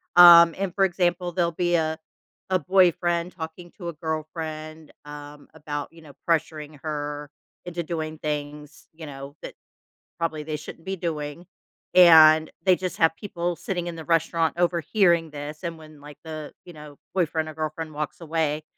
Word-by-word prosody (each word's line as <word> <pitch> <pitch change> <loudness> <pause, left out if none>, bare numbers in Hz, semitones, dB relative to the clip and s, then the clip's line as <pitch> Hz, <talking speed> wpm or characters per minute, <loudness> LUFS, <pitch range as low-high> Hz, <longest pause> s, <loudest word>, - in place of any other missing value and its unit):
Um, 170 -1 +9
and, 190 -2 -2
for 195 -1 +3
example, 175 -1 0
there'll 170 -1 0
be 175 +1 0
a 160 -1 0 0.5
a 185 - +4
boyfriend 175 0 +2
talking 170 +1 -8
to 175 -3 -5
a - - -6
girlfriend, 155 0 -6
um, 145 0 -10
about, 145 -1 -5
you 165 - -16
know, 150 -3 -14
pressuring 155 -3 -1
her 145 -1 -4 0.4
into 175 -1 -4
doing 160 -1 -4
things, 150 0 -5
you 160 0 -10
know, 140 0 -9
that - - -7 0.7
probably 160 -2 -2
they 155 0 -4
shouldn't 165 +2 -11
be 195 0 -3
doing. 160 -2 -5 0.5
And 160 -3 +8 0.2
they 185 -2 +6
just 185 -1 -4
have 165 -1 +3
people 175 -4 -3
sitting 175 0 -4
in 170 - -5
the 160 - -8
restaurant 165 0 +1
overhearing 170 -1 +2
this, 150 +1 -7
and 170 -2 -4
when, 155 -1 -15
like, 145 0 -12
the, 155 -2 -7
you 175 - -11
know, 150 -2 -12 0.2
boyfriend 160 -3 0
or - - -8
girlfriend 155 0 -4
walks 150 +2 -5
away, 155 -2 -1
160 Hz, 165 wpm, -25 LUFS, 150-175 Hz, 0.7 s, Um